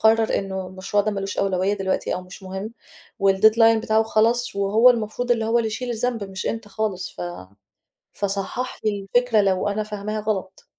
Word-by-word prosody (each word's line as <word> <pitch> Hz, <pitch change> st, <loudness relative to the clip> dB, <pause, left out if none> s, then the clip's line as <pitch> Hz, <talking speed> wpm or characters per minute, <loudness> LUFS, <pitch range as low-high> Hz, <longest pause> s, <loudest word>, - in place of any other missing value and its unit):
قرَّر 220 Hz, 0 st, +4 dB
إنه 190 Hz, -1 st, -4 dB
المشروع 190 Hz, +2 st, -1 dB
ده 215 Hz, -, 0 dB
ما 195 Hz, -1 st, -3 dB
لوش 195 Hz, +1 st, -4 dB
أولوية 195 Hz, +1 st, +1 dB
دلوقتي 195 Hz, -1 st, -1 dB
أو 180 Hz, -, -5 dB
مش 185 Hz, +2 st, -12 dB
مهم 190 Hz, +3 st, -5 dB, 0.5 s
والdeadline 220 Hz, +4 st, +5 dB
بتاعه 220 Hz, 0 st, +3 dB
خلص 225 Hz, +1 st, +1 dB
وهو 215 Hz, +5 st, +5 dB
المفروض 235 Hz, +1 st, -2 dB
اللي 230 Hz, -2 st, +2 dB
هو 230 Hz, +2 st, +2 dB
اللي 225 Hz, -, 0 dB
يشيل 240 Hz, +3 st, -3 dB
الذنب 235 Hz, -2 st, -1 dB
مش 190 Hz, -1 st, -6 dB
أنت 225 Hz, -2 st, -3 dB
خالص، 200 Hz, -4 st, -3 dB
ف -, -, -8 dB, 0.9 s
فصحَّح 200 Hz, +5 st, -3 dB
لي 200 Hz, -2 st, -1 dB
الفكرة 245 Hz, -3 st, +4 dB
لو 195 Hz, 0 st, +1 dB
أنا 210 Hz, +1 st, -1 dB
فاهماها 210 Hz, 0 st, -4 dB
غلط. 195 Hz, -3 st, -4 dB
210 Hz, 180 wpm, -23 LUFS, 195-225 Hz, 0.9 s, والdeadline